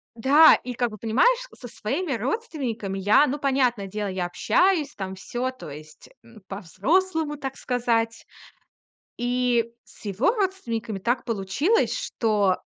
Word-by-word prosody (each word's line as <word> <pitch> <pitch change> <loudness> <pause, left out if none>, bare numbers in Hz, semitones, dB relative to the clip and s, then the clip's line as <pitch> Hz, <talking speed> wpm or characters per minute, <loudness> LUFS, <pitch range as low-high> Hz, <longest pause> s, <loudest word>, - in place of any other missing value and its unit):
Да, 280 +7 +7
и 250 - -5
как 240 -1 -1
бы, 215 - -9
понимаешь, 255 - +3 0.2
со 245 - -8
своими 265 - -3
родственниками 240 - -3
я, 205 +9 +5
ну, 290 +1 -2
понятное 255 -7 +1
дело, 210 +1 -3
я 185 -1 -2
общаюсь 320 - +2
там, 190 -1 -5
всё, 240 +7 -3
то 255 - -10
есть, 155 +2 -12
м, 230 -2 -16
по-взрослому, 295 - 0
так 270 -2 -6
сказать. 230 -2 -1 0.9
И 245 -1 +1
с - - -18
его 205 - +2
родственниками 235 - -2
так 240 +6 -1
получилось, 235 - +1
что 210 - +1
240 Hz, 135 wpm, -25 LUFS, 210-285 Hz, 0.9 s, Да